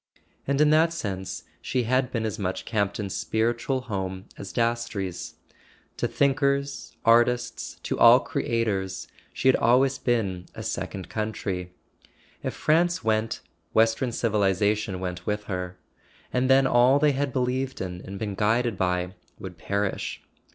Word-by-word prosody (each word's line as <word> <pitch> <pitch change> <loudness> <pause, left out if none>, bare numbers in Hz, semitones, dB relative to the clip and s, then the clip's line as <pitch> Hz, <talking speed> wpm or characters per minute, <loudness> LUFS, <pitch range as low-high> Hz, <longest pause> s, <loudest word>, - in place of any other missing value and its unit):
And 140 0 +1
in 150 0 +5
that 160 +2 +4
sense 95 - -4 0.2
she 125 - -1
had 130 +2 +1
been 115 -2 -1
as 110 0 -3
much 95 -2 -3
Camp 100 -3 0
ton's 100 -3 -4
spiritual 120 +4 0
home 95 -5 -4
as 100 - -8
Dastrey's; 115 -6 -2 0.6
to - - 0
thinkers, 140 -3 0
artists, 120 +1 +2
to - - -2
all - - +9
creators, 100 -5 -2 0.2
she - - -1
had 130 - +7
always 130 +3 +3
been 100 -7 -1
a - - -6
second 95 -2 -4
country. 100 -4 -3 0.7
If - - -3
France 170 -1 +2
went, 110 0 0 0.3
western 115 +3 +3
civilization 105 -2 +1
went 90 -1 -5
with 105 0 -1
her; 90 -2 -4 0.6
and 130 +1 +1
then 135 0 +6
all 125 +2 +5
they 150 0 +4
had 140 0 -1
believed 130 +1 -1
in 90 -1 -5
and 100 +1 -7
been 105 0 -3
guided 110 +2 +1
by 90 0 0 0.2
would 90 -3 -9
perish. 100 +2 -2
110 Hz, 145 wpm, -26 LUFS, 95-130 Hz, 0.7 s, all